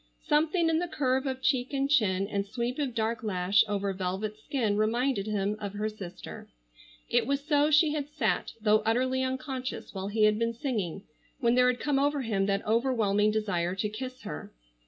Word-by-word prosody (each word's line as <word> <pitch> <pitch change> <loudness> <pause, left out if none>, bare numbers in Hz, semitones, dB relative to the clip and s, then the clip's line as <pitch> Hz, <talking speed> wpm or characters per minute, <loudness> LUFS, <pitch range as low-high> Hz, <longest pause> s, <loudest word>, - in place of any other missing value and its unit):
Something 320 +3 +2
in 325 0 +2
the 355 - -2
curve 265 -3 0
of 260 0 -4
cheek 255 +1 +1
and 275 0 +1
chin, 200 -9 +2
and 200 -1 -1
sweep 240 +5 -3
of 265 -5 -2
dark 225 0 -1
lash 195 -1 +3
over 200 -1 -1
velvet 190 +3 -3
skin, 220 -4 -1
reminded 220 0 +1
him 205 -1 0
of 200 -2 -5
her 210 +1 -2
sister. 195 -5 -9 0.6
It - - +1
was 280 +1 -1
so 295 -1 +3
she 305 0 +4
had 290 -2 -3
sat, 295 -8 -1
though 215 0 +4
utterly 255 +4 +1
unconscious, 260 0 -4
while 190 -1 -4
he 215 +1 +1
had 215 0 +4
been 230 0 0
singing, 210 - -3 0.4
when 235 -3 +3
there 250 0 +5
had 250 -1 +1
come 285 -2 +1
over 285 0 +1
him 200 -4 0
that 200 0 0
overwhelming 220 -3 +2
desire 190 -5 -1
to 210 +2 -1
kiss 255 +4 -7
her. 75 - -7
230 Hz, 190 wpm, -29 LUFS, 205-265 Hz, 0.6 s, there